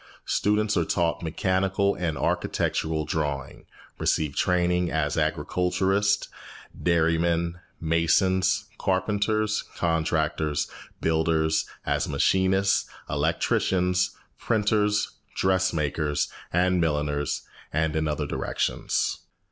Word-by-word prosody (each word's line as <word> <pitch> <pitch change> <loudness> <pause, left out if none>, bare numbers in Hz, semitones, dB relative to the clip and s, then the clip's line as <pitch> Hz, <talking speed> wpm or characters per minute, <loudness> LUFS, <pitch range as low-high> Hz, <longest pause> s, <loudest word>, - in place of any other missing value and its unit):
Students 105 +1 +1
are 85 - +3
taught 85 0 0
mechanical 95 +4 +1
and 85 -4 -2
architectural 80 +4 0
drawing, 70 -4 -3 0.3
receive 75 -3 0
training 90 -1 +2
as 75 -3 0
agriculturists, 95 +3 +1 0.5
dairymen, 85 0 +1 0.2
masons, 85 +3 +2
carpenters, 105 +3 0
contractors, 80 -2 0 0.3
builders, 80 0 +1 0.2
as - - 0
machinists, 95 +1 +2 0.2
electricians, 90 +5 +1 0.2
printers, 105 -1 +1 0.2
dressmakers, 75 -6 +1 0.2
and 90 +1 +2
milliners, 75 -2 -1 0.3
and 80 +1 0
in 80 0 +1
other 75 0 -1
directions. - - -1
85 Hz, 85 wpm, -26 LUFS, 80-95 Hz, 0.5 s, are